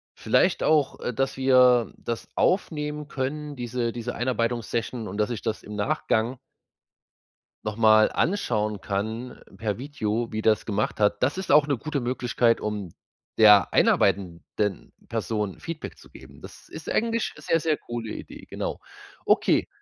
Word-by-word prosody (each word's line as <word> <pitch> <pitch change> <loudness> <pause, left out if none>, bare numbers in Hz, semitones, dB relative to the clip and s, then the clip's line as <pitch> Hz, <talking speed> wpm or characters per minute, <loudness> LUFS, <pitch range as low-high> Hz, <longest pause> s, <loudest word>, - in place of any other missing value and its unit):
vielleicht - - +2
auch, 150 -3 +2
äh 125 - -3
dass 135 +3 -1
wir 125 -2 +4
das 115 -1 -5
aufnehmen 150 -5 0
können, 145 +1 -4
diese 120 -1 -2
diese 120 +1 -5
Einarbeitungs-Session 120 -2 -2
und, 100 - -6
dass 105 +1 +1
ich 120 -4 -4
das 110 -2 -3
im 105 - -9
Nachgang 110 +4 0 1.3
noch 105 -1 -3
mal 110 -1 +5
anschauen 105 - 0
kann 110 +5 -4 0.2
per 105 0 -3
Video, 120 -4 -2
wie 110 - -2
das 110 -1 +2
gemacht 105 -1 -1
hat. 105 +1 +2
Das 140 +8 +1
ist 190 -5 -1
auch 150 0 +6
'ne 140 - 0
gute 150 +2 -3
Möglichkeit, 120 -1 +1
um 105 -3 -3 0.5
der 105 -3 +7
einarbeitenden 95 +1 +1 0.2
Person 105 -4 -3
Feedback 165 -1 -6
zu - - -17
geben. - - -14
Das - - -13
ist - - -9
'ne - - -2
eigentlich 230 0 0
sehr, 165 +2 +1
sehr 155 -2 +1
coole 120 -4 -6
Idee, - - -10
genau. - - -4 0.5
Okay, - - +3
120 Hz, 150 wpm, -25 LUFS, 105-135 Hz, 1.3 s, der